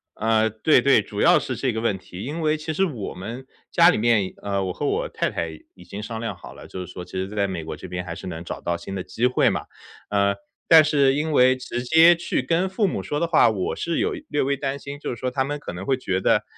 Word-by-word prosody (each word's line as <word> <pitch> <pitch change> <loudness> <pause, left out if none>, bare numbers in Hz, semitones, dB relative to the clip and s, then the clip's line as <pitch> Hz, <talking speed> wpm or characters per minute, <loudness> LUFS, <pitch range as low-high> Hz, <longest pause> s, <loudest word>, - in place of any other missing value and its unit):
呃， 110 0 +2
对 110 0 +3
对。 - - +5
主 - - -5
要 - - +6
是 - - -4
这 130 - -1
个 110 - -2
问 110 -4 0
题。 95 0 -10
因 155 +5 -4
为 155 0 +1
其 155 +1 -4
实 190 +5 +2
我 125 - -5
们 115 +8 -7 0.3
家 170 0 +6
里 - - +2
面， 110 -4 +2
呃， 100 -1 -1
我 90 -1 -3
和 - - -4
我 - - 0
太 - - -1
太 85 - -3 0.3
已 90 - -14
经 100 +4 -8
商 110 +1 -5
量 115 0 -4
好 - - -12
了， - - -12
就 - - -8
是 90 - -12
说 90 -1 -8
其 - - -18
实 95 0 -3
在 100 0 -1
美 90 -4 -4
国 80 0 -6
这 - - -9
边 90 0 -4
还 85 -2 -6
是 95 - -9
能 85 -2 -6
找 - - -6
到 85 0 -1
新 90 +3 -7
的 95 - -3
机 120 +6 0
会 125 - +3
嘛。 - - -3 0.4
呃， 100 -1 +2 0.3
但 160 -2 +8
是 140 -3 +3
因 150 +2 -1
为 130 -2 +5
直 125 -1 -5
接 160 +6 +6
去 170 -5 -2
跟 165 +8 +1
父 195 +2 0
母 - - -3
说 145 - -2
的 170 - 0
话， 160 -7 +5
我 100 -4 -2
是 170 - -2
有 410 +6 0 0.2
略 145 - 0
微 140 +1 0
担 140 0 -3
心， 140 0 -7
就 - - -4
是 - - -4
说 130 +3 -3
他 130 +1 0
们 145 +2 -4
可 - - -7
能 90 +2 -7
会 135 - +2
觉 95 -7 -1
得， - - +2
120 Hz, 295 characters per minute, -23 LUFS, 95-145 Hz, 0.4 s, 但